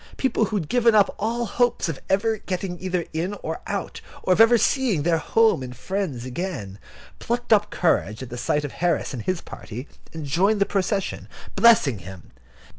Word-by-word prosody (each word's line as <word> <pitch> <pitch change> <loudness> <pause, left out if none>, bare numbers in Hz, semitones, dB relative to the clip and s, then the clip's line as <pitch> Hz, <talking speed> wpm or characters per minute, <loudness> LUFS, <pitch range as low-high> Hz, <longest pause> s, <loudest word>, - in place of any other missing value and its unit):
People 245 -4 +1
who 215 - -4
had 170 -7 -1
given 235 0 +3
up 205 -2 +4
all 235 +3 -1
hopes 240 -2 +1
of 160 -4 -4
ever 215 +3 +1
getting 180 -1 -4
either 185 -2 -1
in 175 +6 -2
or 160 +1 -4
out, 200 -2 -4 0.2
or 185 - +3
of 200 - +4
ever 230 +1 +7
seeing 230 - +1
their 165 0 +2
home 225 -1 +3
and 125 -1 -7
friends 180 -11 -3
again, 130 - -5 0.4
plucked 240 0 0
up 210 -1 +3
courage 110 - 0
at 125 - -10
the - - -5
sight 150 +4 0
of 145 - -5
Harris 170 -5 -1
and 125 - -4
his 185 +8 -2
party, 125 +7 -8 0.2
and 160 -2 -6
joined 190 +9 +2
the 200 - +4
procession, 195 0 -2 0.3
blessing 185 - +5
him. 95 0 -11
185 Hz, 190 wpm, -24 LUFS, 145-215 Hz, 0.4 s, ever